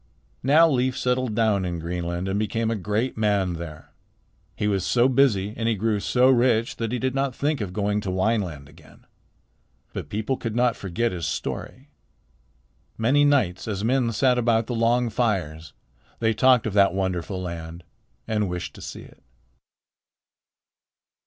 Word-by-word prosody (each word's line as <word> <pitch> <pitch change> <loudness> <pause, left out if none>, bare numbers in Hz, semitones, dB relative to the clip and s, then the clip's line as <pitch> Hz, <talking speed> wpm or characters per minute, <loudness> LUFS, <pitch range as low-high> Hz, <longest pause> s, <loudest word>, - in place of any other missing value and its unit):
Now 155 +6 +5
Leif 130 -3 0
settled 125 -3 0
down 110 -4 +2
in 90 -1 -3
Greenland 85 +2 -3
and 95 +1 -1
became 110 +1 -1
a - - 0
great 105 +6 -2
man 100 -4 +1
there. 80 -2 -9 0.6
He 105 - -1
was 100 -2 0
so 120 0 +3
busy 120 -7 +2
and 115 0 -1
he 115 - +1
grew 105 +1 0
so 125 +5 +3
rich 120 -3 +2
that 115 -1 -3
he 125 - -1
did 130 +1 -1
not 135 -1 -1
think 145 -2 -1
of 100 -3 -4
going 105 +2 -1
to 100 - -4
Wineland 95 -7 -1
again. 75 +2 -19 0.9
But - - -6
people 110 +5 -2
could 115 -2 -4
not 120 -1 +2
forget 105 +5 -2
his 85 -2 -3
story. 135 +3 -5 1.1
Many 130 +6 +3
nights 125 -13 +1
as 100 -2 -3
men 125 0 +1
sat 125 +3 +2
about 115 -1 +2
the 120 - -4
long 120 +1 +1
fires 90 -9 -1 0.5
they 110 -1 +1
talked 130 0 +4
of 110 - -2
that 100 -2 +4
wonderful 95 0 -2
land 85 -1 -7 0.4
and 105 -3 0
wished 90 0 -5
to - - -13
see - - -8
it. - - -18
110 Hz, 165 wpm, -24 LUFS, 95-125 Hz, 1.1 s, Now